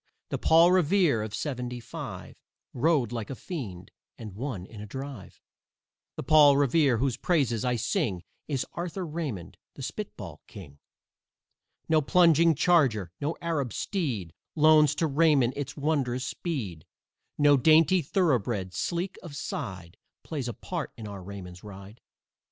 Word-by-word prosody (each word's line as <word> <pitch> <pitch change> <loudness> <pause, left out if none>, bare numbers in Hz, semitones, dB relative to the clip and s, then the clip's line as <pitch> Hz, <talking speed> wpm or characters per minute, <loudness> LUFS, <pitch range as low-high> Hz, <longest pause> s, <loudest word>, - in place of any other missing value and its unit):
The - - -3
Paul 165 +2 +5
Revere 180 - +3
of 105 0 -4
"seventy 125 -1 -4
five" 115 - -8 0.4
Rode 135 -3 +2
like 115 -3 -4
a 135 - -4
fiend 105 - -7 0.3
and 110 -4 -8
won 110 -4 -5
in 105 +1 -11
a 105 - -8
drive. 135 -1 -8 0.8
The - - -5
Paul 145 -1 +6
Revere 140 -2 +3
whose 130 0 0
praises 135 - +1
I 125 -1 +1
sing 110 - -1 0.2
Is 135 -4 -1
Arthur 175 +2 -4
Raymond, 150 - -5 0.2
the - - -8
spitball - - -7
king. 75 -8 -12 1.1
No 160 -1 +3
plunging 165 0 +4
charger, 130 - +2
no 150 +3 -2
Arab 145 -9 -1
steed, 125 - -3 0.2
Loans 155 -2 +5
to 165 - 0
Raymond 145 -4 +3
its 145 +1 -5
wondrous 140 -4 0
speed, 110 - -5 0.5
No 145 -1 +5
dainty 160 +5 +5
thoroughbred, 120 - 0
sleek 175 - -3
of 165 -5 -9
side, 95 - -6 0.3
Plays 140 -6 -4
a 120 - -3
part 170 +4 -5
in 110 -2 -7
our 100 -2 -8
Raymond's 90 -2 -9
ride. 100 +2 -11
140 Hz, 140 wpm, -27 LUFS, 110-160 Hz, 1.1 s, Paul